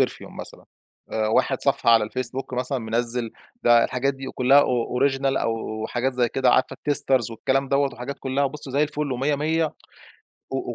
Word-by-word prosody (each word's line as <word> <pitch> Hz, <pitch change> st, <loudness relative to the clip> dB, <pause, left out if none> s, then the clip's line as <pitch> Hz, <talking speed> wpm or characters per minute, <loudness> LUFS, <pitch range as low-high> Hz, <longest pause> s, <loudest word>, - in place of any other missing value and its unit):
perfume -, -, -1 dB
مثلًا -, -, -12 dB, 0.5 s
آآ 110 Hz, -1 st, 0 dB
واحد -, -, +1 dB
صفحة -, -, +2 dB
على 115 Hz, -2 st, +5 dB
الfacebook 130 Hz, +1 st, -4 dB
مثلًا 125 Hz, +2 st, -1 dB
منزّل 115 Hz, +1 st, -2 dB, 0.3 s
ده 120 Hz, -1 st, +5 dB
الحاجات 135 Hz, +2 st, -1 dB
دي 135 Hz, 0 st, -8 dB
آآ -, -, -4 dB
كلّها 135 Hz, +3 st, +5 dB
أو 125 Hz, -2 st, 0 dB
original 135 Hz, 0 st, +1 dB
أو 110 Hz, -1 st, -3 dB
حاجات 125 Hz, +3 st, -1 dB
زي 125 Hz, -2 st, +1 dB
كده 130 Hz, 0 st, +2 dB
عارفة 130 Hz, -, +2 dB
الtesters 135 Hz, -5 st, +1 dB
والكلام 135 Hz, +4 st, -1 dB
دَوّة 140 Hz, 0 st, +1 dB
وحاجات 130 Hz, +3 st, -6 dB
كلّها 135 Hz, +1 st, -1 dB
وبُصّي 140 Hz, 0 st, -5 dB
زي 140 Hz, +3 st, +2 dB
الفل 150 Hz, -2 st, -2 dB
و100 135 Hz, +4 st, 0 dB
100 160 Hz, +3 st, +1 dB, 0.9 s
و -, -, -2 dB
و -, -, -4 dB
130 Hz, 185 wpm, -24 LUFS, 120-140 Hz, 0.9 s, على